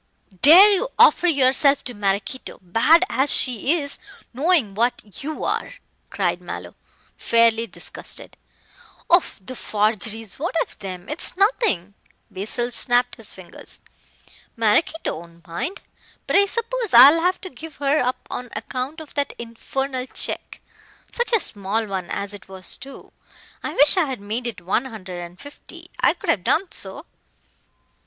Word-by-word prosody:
"Dare 365 +8 +9
you 440 +6 +1
offer 355 - +6
yourself 280 -2 +3
to 245 - -3
Maraquito, 205 +4 -2
bad 230 - +4
as 265 +4 0
she 255 +3 +1
is, 285 -1 -4 0.3
knowing 280 - +2
what 215 -2 -2
you 310 +2 -4
are?" - - -2 0.3
cried - - -1
Mallow, - - -7 0.4
fairly 230 0 +3
disgusted. 185 - -6 0.8
"Oh, 350 +1 +7 0.2
the 225 +7 -7
forgeries. 215 0 -1
What 340 +4 -3
of - - -15
them? 185 -1 -7
It's 305 +4 -4
nothing." 390 - +1 0.4
Basil 230 +5 -3
snapped 245 +1 +1
his 225 -3 -2
fingers. 185 -2 -7 0.8
"Maraquito 230 - +1
won't 170 0 -16
mind. 255 - -4 0.4
But - - -1
I 400 0 +6
suppose 465 +1 -1
I'll 295 +5 +9
have 365 +2 +1
to 370 - -8
give 310 +4 -10
her 285 +2 +1
up 250 +1 -2
on 250 0 -5
account 255 +8 -5
of 310 - -12
that 285 -1 -1
infernal 255 +3 -4
check. - - -3 0.5
Such 480 +1 -1
a 455 - +4
small 210 - -2
one 190 -4 -4
as 200 0 -4
it 200 -1 -12
was 190 -1 -4
too. 275 +1 -12 0.5
I - - -5
wish 290 +6 +6
I 365 - +4
had 265 -5 -5
made 220 +5 -4
it 220 -6 -6
one 195 +8 0
hundred 190 -8 -8
and 175 +1 -9
fifty. 285 0 -13
I - - +3
could - - 0
have 185 - -1
done 355 - +1
so." - - -4
250 Hz, 150 wpm, -22 LUFS, 205-310 Hz, 0.8 s, Dare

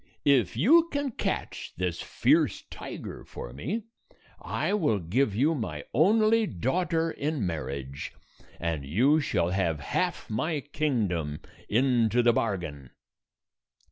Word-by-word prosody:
If 125 -8 +3
you 320 - +5
can 285 -2 -1
catch - - -3
this 90 -2 -2
fierce - - +2
tiger - - -7
for - - -8
me, 170 - -3 0.6
I - - -1
will 155 - +2
give 100 +6 0
you 145 +8 +3
my 75 - -4
only 215 - +4
daughter 165 - 0
in 145 -8 -2
marriage, 70 -5 -4 0.5
and 80 -4 -2
you 125 - +3
shall 90 - 0
have 85 -5 0
half - - -2
my 150 +8 -1
kingdom 105 - -1 0.3
into 120 0 +3
the 120 0 +5
bargain." 80 - -2
120 Hz, 120 wpm, -28 LUFS, -, 0.6 s, you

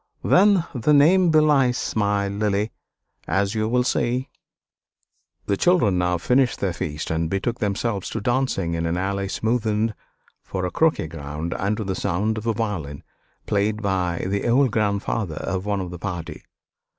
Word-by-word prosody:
"Then 195 -2 +4
the 140 +3 +2
name 175 +5 +5
belies 150 -5 +3
my 100 -1 +1
Lily; 105 +1 -1 0.6
as 100 +1 +1
you 110 -1 -1
will 125 +1 +2
see." 125 +2 0 1.2
The 100 - +1
children 115 - +3
now 90 0 +1
finished 125 +8 +2
their 95 -3 -1
feast 75 -2 -4
and 80 0 -1
betook 100 +6 -2
themselves 100 -1 -1
to 115 - -3
dancing, 120 -7 0
in 85 0 -1
an 85 +1 -1
alley 100 +1 -1
smoothed 110 0 0 0.5
for 95 -1 -4
a 90 - -3
croquet 160 - +2
ground 75 +1 -5
and 100 +2 -1
to 110 - -2
the 95 -1 -2
sound 100 +4 -1
of 110 - -7
a 115 - +2
violin 95 -11 -4 0.4
played 105 +1 0
by 90 -4 -1
the 100 +3 -1
old 130 +1 +4
grandfather 100 -4 -1
of 95 +4 -3
one 100 -1 0
of 90 -2 -5
the 90 - -8
party. 90 -4 -6
100 Hz, 160 wpm, -23 LUFS, 90-120 Hz, 1.2 s, name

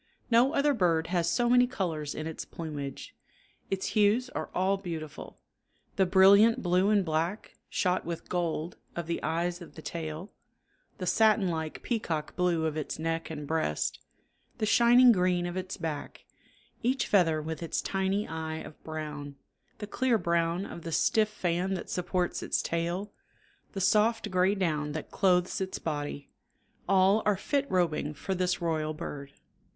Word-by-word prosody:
No 245 +5 +5
other 290 -1 +3
bird 170 -8 +2
has 170 -2 +2
so 240 +7 +1
many 245 +1 +5
colors 165 - -3
in 155 - -4
its 160 -1 -5
plumage. 145 -4 -7 0.5
Its 190 -1 -2
hues 220 +4 +2
are - - -4
all 190 +2 +2
beautiful; 165 -6 -7 0.6
the 190 - +3
brilliant 200 +6 +6
blue 180 +2 +3
and 205 -3 +3
black, 165 +6 -2 0.2
shot 185 -1 0
with 170 0 -6
gold, 170 -1 -2 0.2
of 170 - -3
the 170 +1 -3
eyes 170 +3 -1
of 170 - -12
the 160 - -9
tail, 165 +3 -5 0.7
the 185 - -4
satin 215 0 +3
like 160 -2 -4
peacock 165 -10 -2
blue 175 -3 +1
of 155 -1 -1
its 155 -2 -4
neck 165 +1 -2
and 150 -2 -6
breast, 150 - -1 0.6
the 215 - 0
shining 240 +3 +6
green 180 -3 +2
of 175 0 -4
its 185 0 -4
back, 160 -5 -5 0.6
each 255 +3 +1
feather 165 -6 +3
with 160 +2 -5
its 165 - -2
tiny 195 +2 -1
eye 160 0 -4
of 155 - -10
brown, 150 -2 -6 0.4
the 210 - -5
clear 240 +3 +1
brown 170 0 0
of 170 - -8
the 165 - -6
stiff 215 +6 +2
fan 185 -1 -1
that 180 - -6
supports 180 0 -1
its - - -1
tail, 175 +5 -2 0.6
the 195 - -4
soft 215 +2 +2
gray 185 +2 +3
down 155 -6 -1
that 155 - -6
clothes 180 -1 +2
its 190 0 -3
body 145 -2 -4 0.6
all 195 +2 +4
are 210 -2 +2
fit 280 +6 -1
robing 160 -4 0
for 190 +7 -3
this 180 -1 0
royal 155 -2 -1
bird. 140 -4 -7
175 Hz, 160 wpm, -29 LUFS, 160-200 Hz, 0.7 s, brilliant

